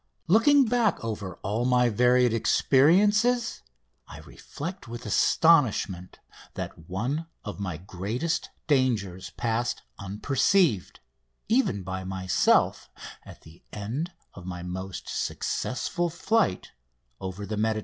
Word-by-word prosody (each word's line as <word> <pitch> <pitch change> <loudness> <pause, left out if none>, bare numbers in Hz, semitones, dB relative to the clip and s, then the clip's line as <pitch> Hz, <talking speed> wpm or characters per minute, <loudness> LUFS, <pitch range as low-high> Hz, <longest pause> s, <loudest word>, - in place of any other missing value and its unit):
Looking 255 - +5
back 230 - +1
over 100 -5 -4
all 105 +5 -1
my 125 -1 +3
varied 125 +2 +3
experiences 205 - +3 0.5
I - - -10
reflect 175 +2 -8
with 115 0 -8
astonishment 110 - +2 0.4
that 80 - -7
one 130 - -2 0.2
of 105 -1 -6
my 90 -5 -3
greatest 100 - -3 0.2
dangers 110 - 0
passed 120 +1 -2 0.2
unperceived, 115 - +1 0.5
even 220 - +1
by 95 0 -5
myself 95 0 +1 0.3
at - - -13
the 80 +2 -17
end 120 - -4 0.2
of 90 -1 -11
my 90 -1 -6
most 95 +1 -6
successful 175 +7 -2
flight 195 - 0 0.5
over 95 +2 -6
the 105 +2 -4
Mediterranean. 110 +1 0
115 Hz, 110 wpm, -27 LUFS, -, 0.5 s, Looking